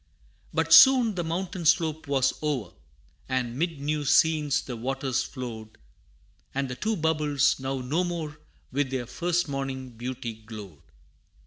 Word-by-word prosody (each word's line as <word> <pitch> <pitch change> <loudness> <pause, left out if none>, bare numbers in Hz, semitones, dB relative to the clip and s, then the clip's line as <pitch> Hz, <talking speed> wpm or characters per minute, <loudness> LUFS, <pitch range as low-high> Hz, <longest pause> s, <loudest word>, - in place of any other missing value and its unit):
But 160 0 +2
soon 245 +4 +8
the 175 -2 -2
mountain 175 +2 -3
slope 160 -1 +2
was 135 -2 +2
o'er, 140 - -2 0.6
And 125 -2 -1
'mid 165 +1 -2
new 150 +1 -1
scenes 150 0 +3
the 125 - -6
waters 135 +2 -1
flowed, 115 -5 -7 0.8
And 140 0 0
the 125 - -4
two 220 - -1
bubbles 150 -5 +1
now 135 0 -3
no 150 +8 0
more 160 -4 -4 0.3
With 140 0 0
their 130 -2 -3
first 175 +8 -1
morning 135 -2 -4
beauty 120 0 -5
glowed. 105 -7 -11
140 Hz, 140 wpm, -27 LUFS, 130-160 Hz, 0.8 s, soon